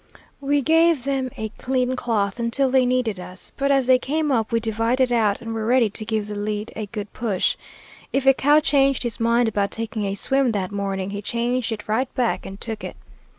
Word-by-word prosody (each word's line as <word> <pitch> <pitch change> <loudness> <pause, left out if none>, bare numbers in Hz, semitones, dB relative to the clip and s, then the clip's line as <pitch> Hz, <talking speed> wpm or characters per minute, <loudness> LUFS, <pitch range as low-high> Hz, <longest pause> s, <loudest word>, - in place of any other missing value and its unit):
We 285 0 +1
gave 325 -2 +4
them 270 -1 -1
a 220 0 -3
clean 255 0 0
cloth 220 -4 -1
until 245 +3 +1
they 260 -1 +4
needed 245 -6 0
us, 180 +1 -9
but 275 0 0
as 270 -2 +3
they 255 0 +5
came 300 +3 -1
up 225 -4 0
we 230 - +2
divided 230 +3 0
out 215 -4 +2
and 225 -1 -5
were 220 -1 -3
ready 240 -3 +3
to 215 - -5
give 215 -1 -1
the 210 - -6
lead 210 +1 -3
a 215 -1 -4
good 205 -1 -7
push. 210 -6 0 0.6
If 270 0 0
a 270 - +7
cow 290 +3 +4
changed 275 -2 +2
his 240 -2 -4
mind 235 +1 +3
about 205 -2 0
taking 225 -2 -4
a 195 0 -2
swim 265 +3 +1
that 190 -2 -2
morning, 195 -1 -3
he 205 0 -4
changed 240 +2 -1
it 215 -2 -5
right 235 +5 0
back 245 -2 0
and 195 +1 -9
took 220 -2 -5
it. - - -7
235 Hz, 215 wpm, -23 LUFS, 210-260 Hz, 0.6 s, a